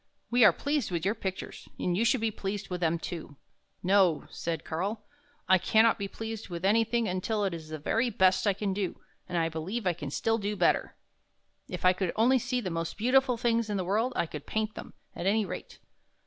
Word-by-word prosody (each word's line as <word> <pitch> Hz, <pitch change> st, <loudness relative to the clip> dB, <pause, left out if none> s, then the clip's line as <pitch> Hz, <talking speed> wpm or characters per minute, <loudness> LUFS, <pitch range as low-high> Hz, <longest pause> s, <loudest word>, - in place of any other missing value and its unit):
We 245 Hz, 0 st, +5 dB
are -, -, +9 dB
pleased 285 Hz, -5 st, -1 dB
with 170 Hz, -2 st, -2 dB
your 200 Hz, -, +2 dB
pictures, 190 Hz, -4 st, -6 dB
and 175 Hz, -, 0 dB
you 210 Hz, -, +2 dB
should 245 Hz, 0 st, +3 dB
be 225 Hz, -1 st, +1 dB
pleased 200 Hz, 0 st, -4 dB
with 180 Hz, 0 st, -3 dB
them, 170 Hz, 0 st, +2 dB
too." 165 Hz, -3 st, -7 dB, 0.2 s
" -, -, -46 dB, 0.2 s
No," 185 Hz, -4 st, +3 dB
said 165 Hz, -2 st, -4 dB
Karl. 200 Hz, +7 st, -3 dB, 0.2 s
" 290 Hz, +1 st, -36 dB
I 190 Hz, 0 st, +6 dB
can 220 Hz, +5 st, +4 dB
not 230 Hz, -1 st, +3 dB
be 200 Hz, -, -2 dB
pleased 225 Hz, +1 st, -6 dB
with 175 Hz, +1 st, -4 dB
anything 225 Hz, +2 st, +2 dB
until 205 Hz, +3 st, -1 dB
it 190 Hz, -, -1 dB
is 160 Hz, -2 st, -7 dB
the 155 Hz, -, -4 dB
very 225 Hz, -, 0 dB
best 190 Hz, -1 st, +3 dB
I 200 Hz, -, +4 dB
can 200 Hz, 0 st, -2 dB
do, 190 Hz, -2 st, -3 dB, 0.3 s
and 175 Hz, -, -1 dB
I 165 Hz, -1 st, +2 dB
believe 175 Hz, +8 st, -4 dB
I 180 Hz, -, +3 dB
can 150 Hz, -4 st, -6 dB
do -, -, -5 dB
still 225 Hz, 0 st, +1 dB, 0.2 s
better. -, -, +2 dB, 0.7 s
If -, -, -4 dB
I 185 Hz, -, +7 dB
could 180 Hz, -2 st, -2 dB
only 250 Hz, +4 st, +4 dB
see 250 Hz, +1 st, -1 dB
the 185 Hz, -5 st, -3 dB
most 165 Hz, 0 st, -3 dB
beautiful 255 Hz, +2 st, +3 dB
things 230 Hz, -1 st, +1 dB
in 205 Hz, -, -1 dB
the 185 Hz, -, -2 dB
world, 220 Hz, +7 st, +1 dB
I -, -, +1 dB
could 150 Hz, -3 st, -8 dB
paint 215 Hz, 0 st, -1 dB
them, -, -, -10 dB, 0.2 s
at 175 Hz, -, -3 dB
any 215 Hz, +1 st, +3 dB
rate. -, -, -7 dB
200 Hz, 230 wpm, -29 LUFS, 175-225 Hz, 0.7 s, are